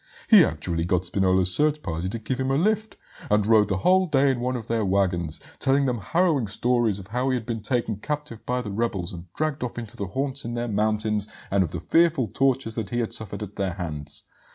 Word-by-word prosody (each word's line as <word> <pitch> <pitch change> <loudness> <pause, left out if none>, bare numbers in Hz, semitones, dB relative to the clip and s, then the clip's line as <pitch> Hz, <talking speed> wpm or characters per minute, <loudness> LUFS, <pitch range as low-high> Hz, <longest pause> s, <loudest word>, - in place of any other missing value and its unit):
He 210 -5 +10
actually 85 - -1
got 90 +1 0
Spinola's 95 0 +2
search 150 0 +2
party 85 +1 -3
to 115 - -3
give 125 +4 -4
him 130 0 0
a 135 - +2
lift, 215 +5 0 0.3
and 105 -1 +3
rode 110 -2 +5
the 95 - 0
whole 185 - +3
day 140 -3 +3
in 130 - -2
one 125 +1 -1
of 115 -3 -5
their 115 -1 0
waggons, 90 -5 0 0.2
telling 135 +1 +2
them 125 -3 0
harrowing 155 - +1
stories 115 0 +1
of 100 - -9
how 125 +4 0
he 130 - +2
had 120 -3 -3
been 115 -1 -3
taken 115 -1 -1
captive 150 -1 -5
by 125 0 -1
the 105 -4 -6
rebels 100 -5 -2
and 85 0 -10
dragged 155 -3 -1
off 120 - -5
into 115 -1 -6
their 100 -4 -4
haunts 135 +6 -2
in 120 +1 -4
the 120 0 -2
mountains, 105 -1 0 0.2
and 100 -1 +3
of 85 - -3
the 90 - -5
fearful 165 - +3
tortures 130 -1 +1
that 110 -4 -4
he 120 - -2
had 115 -2 -1
suffered 105 -1 -5
at 105 0 -9
their 95 -3 -1
hands. 75 -5 -4
115 Hz, 230 wpm, -25 LUFS, 95-135 Hz, 0.3 s, He